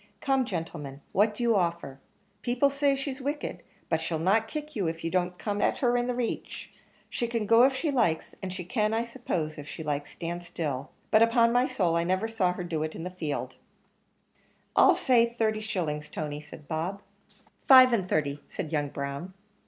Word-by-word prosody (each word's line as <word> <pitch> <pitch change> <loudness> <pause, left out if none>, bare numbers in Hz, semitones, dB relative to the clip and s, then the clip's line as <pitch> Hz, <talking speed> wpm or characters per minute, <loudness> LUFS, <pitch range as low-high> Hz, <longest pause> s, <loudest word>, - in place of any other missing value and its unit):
"Come, 270 -2 +1
gentlemen, 150 - -5
what 210 +2 +3
do 240 - -3
you 230 -2 +3
offer? 170 -7 -1 0.4
people 250 +3 +2
say 280 0 +2
she's 270 0 -4
wicked, 290 +3 -3 0.3
but 160 -1 0
she'll 160 0 -1
not 200 +7 +2
kick 300 -1 -6
you 195 -5 0
if 165 0 -4
you 165 - -2
don't 180 -1 0
come 205 +1 -2
in - - +2
her 245 -3 +1
reach. 245 -1 -2 0.4
She 240 - -2
can 230 -2 -1
go 230 +3 +6
if 265 0 +2
she 300 +3 -1
likes, 195 - +1
and 190 - -4
she 180 -1 -5
can, 215 +1 0
I 230 +1 0
suppose, 180 -11 -3
if 145 0 -9
she 160 - -6
likes, 145 -1 -3
stand 175 +1 -4
still; 150 -5 -4 0.2
but 215 - +6
upon 230 0 +4
my 250 +2 +3
soul, 180 -10 +1
I 170 - +2
never 185 +5 0
saw 215 -5 +1
her 180 - -5
to 175 - -8
do 165 - -1
so 155 +1 -1
in 165 - -6
the 180 - -5
field." 155 -6 -4 1.2
"I'll - - +7
say 235 -2 +3
thirty 215 -1 +1
shillings, 155 -8 -3
Tony," 150 -1 -4
said 150 -1 -13
Bob. 170 +6 -3 0.6
"Five 255 -2 +9
and 190 -5 0
thirty," 145 -2 0
said 155 - -5
young 145 -2 0
Brown. 140 +6 -5
190 Hz, 200 wpm, -28 LUFS, 160-235 Hz, 1.2 s, Five